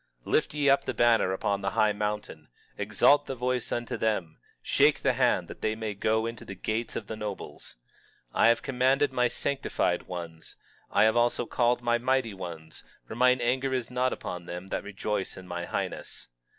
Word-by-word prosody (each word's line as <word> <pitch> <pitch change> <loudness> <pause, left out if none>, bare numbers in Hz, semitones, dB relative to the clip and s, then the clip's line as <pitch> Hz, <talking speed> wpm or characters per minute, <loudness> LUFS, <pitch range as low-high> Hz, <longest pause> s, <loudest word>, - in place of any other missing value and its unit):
23:2 - - -7
Lift 155 - +2
ye 145 -1 +1
up 140 0 +4
a - - 0
banner 115 -5 +4
upon 100 +1 -1
the 100 - 0
high 110 -1 +4
mountain, 105 -7 -4 0.3
exalt 105 +8 +3
the 135 - -3
voice 125 0 -1
unto 120 -1 -2
them, 95 -8 -1 0.2
shake - - +3
the - - +2
hand, - - +2
that - - -11
they 110 0 0
may 110 -1 -4
go 110 +2 +1
into 115 -1 -5
the 100 - -8
gates 110 +4 -3
of 110 - -4
the 110 - -5
nobles. 105 -2 -7 0.6
23:3 - - -5
I - - +7
have 115 - +4
commanded 135 +1 +2
my 125 -1 +3
sanctified 135 -9 -1
ones, 85 -3 -8 0.3
I - - +4
have 110 +1 +4
also 120 0 +2
called 120 +1 +1
my 120 0 +2
mighty 130 -2 +1
ones, 85 -4 -8 0.2
for - - -7
mine 125 +1 +4
anger 130 +2 +1
is 125 -2 -3
not 125 +1 +1
upon 90 -1 -6
them 90 +2 -7
that - - -2
rejoice 105 0 -3
in 95 - -10
my 85 -1 -4
highness. - - -5
110 Hz, 195 wpm, -28 LUFS, 100-125 Hz, 0.6 s, I